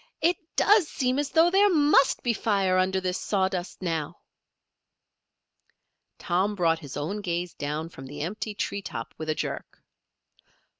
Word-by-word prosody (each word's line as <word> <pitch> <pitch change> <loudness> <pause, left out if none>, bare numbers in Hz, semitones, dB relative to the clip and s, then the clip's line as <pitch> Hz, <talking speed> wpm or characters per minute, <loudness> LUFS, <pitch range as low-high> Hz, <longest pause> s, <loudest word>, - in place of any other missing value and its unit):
"It 345 +1 +2 0.2
does 410 -5 +5
seem 255 -1 0
as 290 -1 -1
though 330 +3 +4
there 400 +2 +5
must 295 -5 +4
be 240 - +2
fire 195 -4 +1
under 190 +1 +1
this 185 0 -2
sawdust 190 -2 -2
now." 160 -4 -2 2.0
Tom 190 +4 0
brought 165 -3 +2
his 145 -3 -8
own 170 +9 -3
gaze 175 -2 -3
down 150 +3 -3
from 135 -5 -11
the 145 +2 -7
empty 210 +5 -4
tree 200 0 -3
top 180 - -6
with 155 0 -5
a 155 - +1
jerk. - - -5
190 Hz, 150 wpm, -26 LUFS, 165-250 Hz, 2.0 s, does